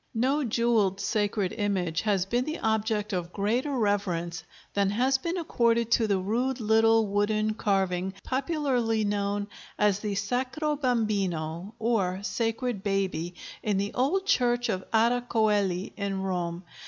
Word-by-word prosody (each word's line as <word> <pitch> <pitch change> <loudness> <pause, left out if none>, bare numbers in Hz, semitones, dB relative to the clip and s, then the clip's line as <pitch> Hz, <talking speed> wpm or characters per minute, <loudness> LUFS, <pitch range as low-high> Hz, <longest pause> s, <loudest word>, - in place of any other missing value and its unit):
No 270 +6 +2
jewelled 225 -5 +1
sacred 205 -2 0
image 190 -7 -1
has 200 -4 +1
been 240 +5 0
the 310 +4 -4
object 220 -2 0
of 175 -1 -2
greater 240 +9 0
reverence 175 -6 -1 0.3
than 200 -1 +2
has 255 +6 +2
been 340 +5 -2
accorded 235 -8 +1
to 225 -2 +3
the 200 -2 +2
rude 240 +7 -1
little 225 0 +4
wooden 215 +1 +1
carving 190 -3 0
popularly 260 -5 0
known 205 0 -1 0.3
as 205 -2 +2
the 210 -1 -3
"Sacro 255 +9 -1
Bambino" 200 - -1
or 200 -5 0
"Sacred 225 +2 -1
Baby," 190 -4 -1 0.3
in 210 -3 0
the 200 +1 -2
old 315 +10 +1
church 245 -10 +2
of 185 -3 -1
Ara 235 +2 +3
Coeli 205 -6 +1
in 195 -2 -2
Rome. 175 -2 -2
215 Hz, 140 wpm, -27 LUFS, 195-240 Hz, 0.3 s, little